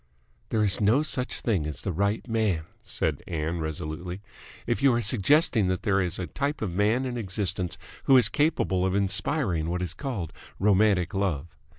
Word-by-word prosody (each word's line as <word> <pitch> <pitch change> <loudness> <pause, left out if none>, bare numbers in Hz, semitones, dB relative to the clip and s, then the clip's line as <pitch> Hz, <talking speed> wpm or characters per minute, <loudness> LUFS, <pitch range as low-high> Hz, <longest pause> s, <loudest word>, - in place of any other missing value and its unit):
"There 110 -1 +1
is 100 -1 +2
no 115 +9 +4
such 130 -4 -2
thing 95 -10 0
as 75 -5 -6
the 95 - -1
right 100 +7 -1
man," 110 -8 0 0.2
said - - -2
Ann 80 0 -2
resolutely, 80 +4 -5 0.4
"if 120 +2 -1
you 135 -1 +5
are 120 - +1
suggesting 115 - +3
that 95 0 -1
there 100 -1 +2
is 90 -2 -2
a 90 - -3
type 140 - -3
of 100 - -2
man 105 +8 +1
in 125 -1 -3
existence 95 -4 -1 0.3
who 135 - +7
is 125 - +6
capable 145 - +1
of 95 0 0
inspiring 100 - 0
what 90 +1 -2
is 90 -2 -3
called 115 - -5 0.2
romantic 100 -2 +3
love. 85 -6 -2
100 Hz, 180 wpm, -26 LUFS, 90-115 Hz, 0.4 s, who